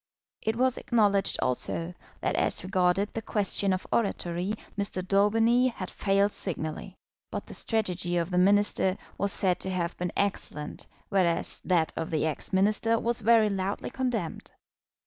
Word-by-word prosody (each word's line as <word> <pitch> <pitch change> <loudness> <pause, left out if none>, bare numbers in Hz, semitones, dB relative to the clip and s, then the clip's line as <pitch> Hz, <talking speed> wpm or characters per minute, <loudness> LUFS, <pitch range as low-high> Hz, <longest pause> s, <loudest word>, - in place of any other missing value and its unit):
It 220 +1 -1
was 255 +1 +2
acknowledged 205 -4 +2
also 165 +7 -1 0.3
that - - 0
as - - 0
regarded 185 +1 +1
the 225 - -3
question 200 -2 0
of 185 0 -1
oratory 185 -2 -1 0.2
Mr. 200 -3 -2
Daubeny 225 +5 +4
had 190 -7 -5
failed 200 0 +2
signally. 175 0 -4 0.3
But - - -5
the - - -10
strategy 180 -6 0
of 170 +1 -1
the 180 - +2
Minister 200 0 +3 0.2
was 200 0 +1
said 185 -3 +1
to 190 - -4
have 175 -2 -2
been 180 0 -2
excellent, 190 -6 -2 0.2
whereas 180 -4 +1
that 170 -4 +1
of 165 - -3
the 155 -1 0
ex 155 -2 -3
Minister 210 +4 +2
was 235 +1 -1
very 220 -1 +5
loudly 195 +1 -2
condemned. 240 -10 -3
195 Hz, 150 wpm, -28 LUFS, 180-215 Hz, 0.3 s, very